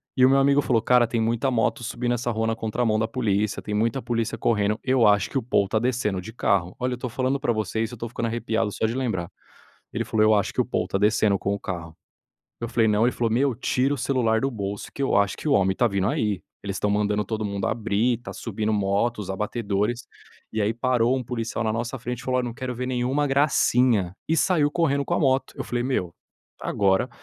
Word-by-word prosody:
e 130 -1 +5
o - - +6
meu 135 0 +4
amigo 140 +1 +4
falou: 115 -5 +1
"Cara, 125 -1 +4
tem 115 0 -2
muita 115 +4 0
moto 120 +2 0
subindo 120 +1 -2
essa 120 0 -1
rua 110 0 -1
na 115 - 0
contramão 110 0 0
da 110 +1 0
polícia, 105 -4 0
tem 105 - -5
muita 115 +5 0
polícia 115 -2 -2
correndo, 105 -1 +1
eu 130 -3 +3
acho 105 -2 +4
que 135 - -2
o 130 - -1
Paul 100 -4 +2
está 110 - -1
descendo 115 -6 -1
de 110 - -9
carro". 95 -6 0
Olha, 125 0 -1
eu - - -2
estou 125 0 -5
falando 130 +3 -1
para 120 - +1
você 110 +1 -2
isso, 115 +2 -4
eu - - -5
estou 115 - -5
ficando 115 -1 -3
arrepiado 115 -2 -1
só 110 - -1
de 115 +3 -1
lembrar. 110 -10 -2 0.6
Ele - - -2
falou: 110 -1 +1
"Eu 110 - +5
acho 100 - 0
que - - +2
o - - -1
Paul - - -1
está 100 - -1
descendo 105 -1 +3
com 100 - -1
o 100 - -3
carro". 80 -4 -6 0.7
Eu 115 - -2
falei: 115 -2 +2
"Não", 105 +2 +3
ele 125 - +3
falou: 115 -2 -1
"Meu, 130 +2 +2
tira 130 +2 0
o - - -2
celular 115 -4 +1
do 135 - +1
bolso 100 -2 -5
que 140 - -3
eu - - +1
acho 100 0 +1
que - - -6
o - - +3
homem 95 -1 +3
está 120 +4 +2
vindo 100 -1 0
aí, 105 -6 0 0.2
eles 100 -1 -4
estão 105 - 0
mandando 105 0 +1
todo 110 0 -3
mundo 100 -1 -2
abrir, 115 +1 0
está - - -8
subindo 110 -1 -2
moto, 105 +3 0
os 95 - -6
abatedores", 105 +3 -2 0.5
e 110 - 0
aí 105 +2 +1
parou 125 +1 +1
um 125 - -4
policial 115 -1 -3
na 110 - +1
nossa 115 +3 -3
frente 125 0 -4
e - - -13
falou: 130 0 +1
"Olha 125 - -2
não 120 - -4
quero 130 -3 -4
ver 125 +1 -3
nenhuma 130 +3 0
gracinha", 125 - +2
e 160 - +2
saiu 155 -5 +3
correndo 140 -4 +1
com 175 - -1
a - - 0
moto. 135 -3 +1
Eu - - -3
falei: 120 0 -2
"Meu, 90 -10 -1 0.5
agora". 95 -1 +1
115 Hz, 245 wpm, -24 LUFS, 105-125 Hz, 0.7 s, o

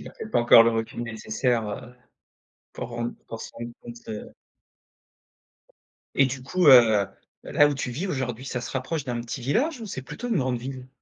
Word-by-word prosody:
avait - - -10
pas - - -24
peut-être 220 - -7
pas - - +4
encore 120 -1 +8
le 115 - +4
recul 115 +1 -3
nécessaire, 115 0 -1
heu, 120 +4 -7 0.8
pour - - -6
rendre 120 0 -3
pour 115 - -7
se - - -8
rendre 120 0 -7
compte 120 0 -9
de 105 -1 -7 1.8
Et 135 - +5
du 130 0 -5
coup, 180 +4 +1
heu, - - +11
heu, 110 -4 +2 0.4
là 145 - +4
où 145 - -1
tu 130 -2 -3
vis 160 +11 -3
aujourd'hui, 130 -6 -3
ça 130 -2 -3
se - - -6
rapproche 135 +3 -3
d'un 120 -2 -3
petit 120 +2 -6
village 245 - 0
ou 225 - -6
c'est 130 -10 -5
plutôt 245 - -7
une 230 - +1
grande 130 -2 0
ville? 130 +1 -7
125 Hz, 205 wpm, -25 LUFS, 120-140 Hz, 1.8 s, heu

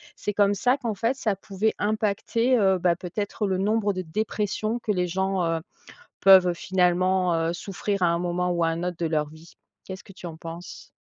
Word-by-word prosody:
c'est 210 - -3
comme 205 0 +3
ça 250 +7 +2
qu'en 235 -6 -3
fait 230 +6 0
ça 215 -6 0
pouvait 200 +2 -1
impacter, 215 +3 +1
heu, 190 -3 +3
bah, 170 0 +2
peut-être 205 +4 -3
le 190 - 0
nombre 205 +1 +1
de 185 - -3
dépressions 215 +5 -2
que 215 - -2
les 180 -1 0
gens, 190 +1 -1
heu, 165 0 0 0.6
peuvent 185 -2 +7
finalement, 180 0 +1
heu, 165 +1 0
souffrir 200 +2 -3
à 175 - +4
un 170 0 +1
moment 180 0 -1
ou 170 -1 0
à 165 - +3
un 165 +1 -3
autre 180 -1 -3
de 170 - -2
leur 150 -2 0
vie. 160 +2 -15 0.3
Qu'est-ce 190 -1 -8
que 195 - -14
tu 180 - -9
en 160 -1 -8
penses? 175 - -9
190 Hz, 205 wpm, -25 LUFS, 175-210 Hz, 0.6 s, peuvent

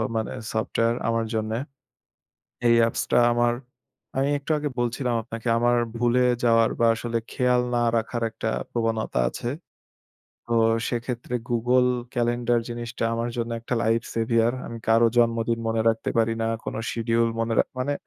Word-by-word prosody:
মানে 110 -1 -1 0.2
সফটওয়ার 115 +1 0
আমার 115 0 +1
জন্যে। 110 0 -1 1.1
এই 115 - +6
অ্যাপসটা 115 +1 +1
আমার 120 0 +2 0.6
আমি 135 +1 +2
একটু 140 +2 -11
আগে 150 0 -2
বলছিলাম 120 +1 0
আপনাকে 115 +1 -6
আমার 120 +1 +3 0.2
ভুলে 120 +1 +2 0.2
যাওয়ার 115 -1 +4
বা 115 - +5
আসলে 115 0 -2
খেয়াল 125 -1 +2
না 120 - +2 0.2
রাখার 115 +1 -2
একটা 110 - -4 0.2
প্রবণতা 115 - -1
আছে। 120 - -5 1.0
তো 120 - -1 0.3
সেক্ষেত্রে 120 0 -4 0.2
Google 125 +2 +3 0.3
Calendar 120 0 +1
জিনিসটা 120 0 -4
আমার 115 +1 -1
জন্য 115 0 -2
একটা 115 +2 -3
লাইফ 115 0 +2
সেভিয়ার। 115 0 +2
আমি 115 - -7
কারো 115 +1 +5
জন্মদিন 115 -1 +2
মনে 115 0 0
রাখতে 115 0 0
পারি 115 0 +3
না। - - 0 0.2
কোনো - - -4
শিডিউল 115 0 +1
মনে 115 0 0
রা - - +7 0.2
মানে 130 +3 0
115 Hz, 150 wpm, -25 LUFS, 115-120 Hz, 1.1 s, রা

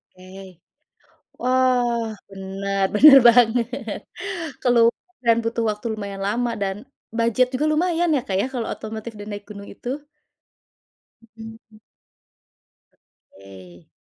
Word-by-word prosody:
Oke. 185 -1 -13 0.8
Wah, 250 -2 +1 0.3
benar, 195 0 -3
benar 275 +5 +9
banget. 235 -1 +2 0.6
Keluar 235 -2 +4 0.3
dan 230 -1 +5
butuh 230 0 -1
waktu 210 +2 -6
lumayan 200 -2 -6
lama 235 +4 -1
dan 195 -1 -1 0.4
budget 235 +2 +2
juga 295 +4 0
lumayan 345 +2 +1
ya, 270 - 0
Kak, 190 - -2
ya - - 0
kalau 235 -3 -2
otomotif 220 +1 -7
dan 205 - -9
naik 205 - -8
gunung 200 -1 -9
itu. 270 +4 -6 1.3
Mhm. 225 -1 -13 1.6
Oke. 95 -3 -15
225 Hz, 110 wpm, -22 LUFS, 195-245 Hz, 1.6 s, benar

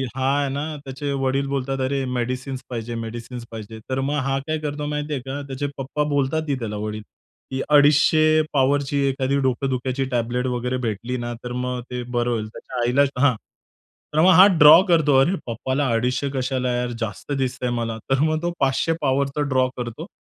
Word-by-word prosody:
हा 130 -1 -1
आहे 140 -1 0
ना, 140 +1 -2 0.2
त्याचे 135 +1 -4
वडील 135 +1 0
बोलतात, 135 -1 -2
"अरे 135 +1 0
मेडिसिन्स 125 +2 -3
पाहिजे, 120 -1 -4
मेडिसिन्स 115 +1 -6
पाहिजे." 110 0 -8
तर 130 0 -1
मग 140 +2 -1
हा 135 0 0
काय 155 0 0
करतो 150 -1 -4
माहिती 150 0 -3
आहे 135 - -2
का? 135 +2 -4
त्याचे 135 +1 -3
पप्पा 140 +2 -2
बोलतात, 145 +2 0
ही 140 - +2
त्याला 110 -3 -4
वडील, 105 +1 -4 0.5
की 130 0 -2
"250 155 +2 +5
पॉवरची 140 +1 +2
एखादी 135 0 0
डोकं 130 +1 0
दुखायची 130 +1 -1
टॅबलेट 120 +1 -1
वगैरे 125 0 -1
भेटली 115 +4 -3
ना 120 0 -4
तर 125 - -5
मग 125 0 -3
ते 125 0 -4
बरं 120 0 -1
होईल." 110 -2 -2
त्याच्या 125 - -7
आईला 125 +4 +3 0.2
हां. 140 -4 +4 0.8
तर 155 - +3
मग 185 +3 +7
हा 185 +3 +9
ड्रॉ 155 +4 +10
करतो, 155 -6 +4
"अरे 175 +8 +2
पप्पाला 130 +4 -1
250 125 +4 0
कशाला 130 -1 -1
यार, 125 0 -1
जास्त 115 +5 -5
दिसतं 130 -1 -2
आहे 120 -1 0
मला." 115 -1 -2
तर 135 0 +2
मग 155 0 +1
तो 175 0 -1
500 135 +4 +1
पॉवर 140 -1 +2
तर 150 - 0
ड्रॉ 130 0 +3
करतो. 125 +7 -5
130 Hz, 195 wpm, -22 LUFS, 125-145 Hz, 0.8 s, ड्रॉ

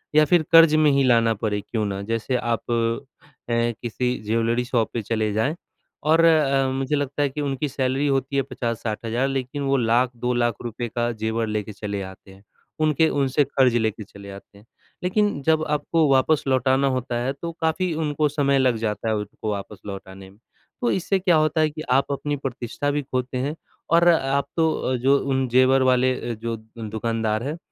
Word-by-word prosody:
या 155 0 +6
फ़िर 175 0 +3
कर्ज़ 165 -2 +7
में 150 -2 +4
ही 140 0 +3
लाना 115 -2 +4
पड़े 105 -1 -2
क्यों 110 0 -3
ना। 100 -1 -3
जैसे 115 +4 -2
आप 120 -1 -2
अ, 120 +3 -4
किसी 120 +1 -1
ज्वेलरी 115 +2 0
शॉप 115 -3 0
पे 115 - -2
चले 110 0 -1
जाएँ 115 +9 0 0.5
और 165 +2 +4
अ, 140 -4 +3
मुझे 135 +2 -1
लगता 145 0 -2
है 140 - +2
कि 150 +2 -5
उनकी 140 0 -2
सैलरी 135 +1 0
होती 135 0 0
है 135 - +3
50-60,000 115 0 -3
लेक़िन 135 +1 -3
वो 135 0 +2
लाख, 120 +1 +2
2 125 +1 -1
लाख 120 -1 +1 0.4
का 120 0 0
ज़ेवर 110 0 -2
लेके 105 0 -3
चले 100 -1 -4
आते 95 0 -10
हैं। 95 +1 -17 0.4
उनके 155 +1 +3
उनसे 140 +1 +1
कर्ज़ 130 -3 +2
लेकर 110 -1 -1
चले 100 0 -13
आते 100 +1 -13
हैं। 105 - -19 0.4
लेकिन 205 -4 +1
जब 160 +1 +2
आपको 155 +1 +1
वापस 135 +3 +3
लौटाना 130 +1 +2
होता 125 -1 -3
है 135 - 0
तो 170 +4 -6
काफ़ी 165 +2 0
उनको 150 0 +1
समय 140 -2 +1
लग 130 -3 +3
जाता 110 0 -3
है 110 - +1
उसको 105 +1 -4
वापस 100 0 -6
लौटाने 95 -1 -9
में। 100 - -20 0.4
तो 240 - +1
इससे 190 +1 0
क्या 180 -3 +3
होता 155 0 +2
है 155 - +3
कि 155 +1 -8
आप 135 +2 +2
अपनी 145 +1 -2
प्रतिष्ठा 130 +3 -3
भी 145 0 -1
खोते 130 -1 -3
हैं 140 +5 -2 0.4
और 170 +1 +5
आप 140 -4 +2
तो 160 -6 +1
जो 135 +3 +3
उन 135 -1 -1
ज़ेवर 130 +2 +4
वाले 130 +1 +3 0.2
अ, - - -2
जो 115 +1 -4 0.2
दुकानदार 110 0 -2
हैं 155 +3 -4
130 Hz, 190 wpm, -23 LUFS, 115-145 Hz, 0.5 s, कर्ज़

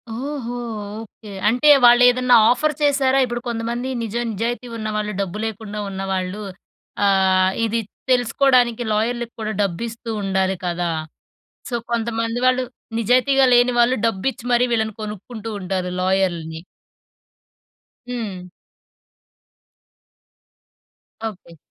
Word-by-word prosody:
ఓహో! 250 -2 -4 0.5
ఓకే. 210 -1 -13 0.2
అంటే 250 +6 +3 0.2
వాళ్ళేదన్నా 245 +1 +6
ఆఫర్ 300 +5 +2
చేశారా? 275 -2 +3
ఇప్పుడు 240 -1 -4
కొంతమంది 235 +2 -3 0.2
నిజ 220 0 -5 0.2
నిజాయితీ 235 +4 -3
ఉన్నవాళ్ళు, 215 -1 -2
డబ్బు 195 +1 -4
లేకుండా 210 -1 -5
ఉన్నవాళ్ళు 190 +1 -3 0.6
ఆహ్, 190 -1 +4 0.2
ఇది 225 +1 0 0.3
తెలుసుకోడానికి 245 -1 +3
లాయర్‌లకి 235 +2 -1
కూడా 215 0 -2
డబ్బిస్తూ 225 +5 -3
ఉండాలి 190 0 0
కదా! 175 0 -1 0.8
సో, 240 - -2 0.2
కొంతమంది 230 0 -1
వాళ్ళు 255 0 +3 0.4
నిజాయితీగా 255 +4 +3
లేని 245 +1 +4
వాళ్ళు 240 +2 +4
డబ్బిచ్చి 230 +4 -2
మరీ 240 +1 +4
వీళ్ళని 220 -1 0
కొనుక్కుంటూ 215 +2 -7
ఉంటారు 185 -1 -2
లాయర్‌లని. 175 -4 0 1.5
హ్మ్. 205 -7 -5 2.8
ఓకే. 180 -5 -15
225 Hz, 100 wpm, -21 LUFS, 195-245 Hz, 2.8 s, వాళ్ళేదన్నా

